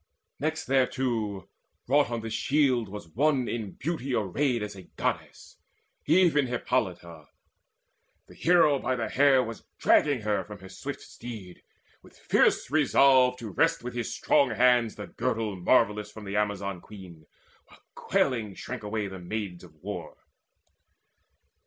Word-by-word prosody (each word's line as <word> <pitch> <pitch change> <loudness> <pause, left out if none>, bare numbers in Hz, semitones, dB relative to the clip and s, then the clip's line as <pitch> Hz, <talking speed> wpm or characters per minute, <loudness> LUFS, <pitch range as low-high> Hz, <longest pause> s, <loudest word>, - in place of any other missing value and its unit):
Next 160 +2 -2
thereto 125 -7 0 0.4
Wrought 145 +3 +3
on 120 -1 -3
the 115 0 -6
shield 125 -2 +1
was 100 -3 -8
one 135 - +1
in 110 -5 -4
beauty 140 -5 -3
arrayed 120 +3 0
As 105 -1 -6
of 95 -2 -11
a - - -24
Goddess, - - -4 0.5
even 160 -4 +4
Hippolyta. 90 - -3 1.0
The - - -16
hero 165 -5 +4
by 130 - -1
the 115 -2 -3
hair 135 -1 +4
was 115 -2 -8
dragging 145 -5 +3
her 105 -1 0
From 105 - -10
her 95 +1 -13
swift 135 +9 -7
steed, 110 -7 -10 0.4
with - - -19
fierce - - +2
resolve 135 -4 +4
to 115 -4 -7
wrest 95 - +1
With 125 - -5
his 120 -1 -3
strong 140 +3 +2
hands 120 -1 +3
the 105 - -7
Girdle 115 -5 -2
Marvellous 105 +2 +2
From 105 0 -10
the 100 +1 -5
Amazon 100 -3 -1
Queen, 90 -7 -13 0.4
while - - -20
quailing 110 -7 0
shrank 125 -2 -6
away 105 0 -3
The 95 -1 -8
Maids 90 -1 -5
of 80 -3 -15
War. - - -6
115 Hz, 145 wpm, -27 LUFS, 105-130 Hz, 1.0 s, even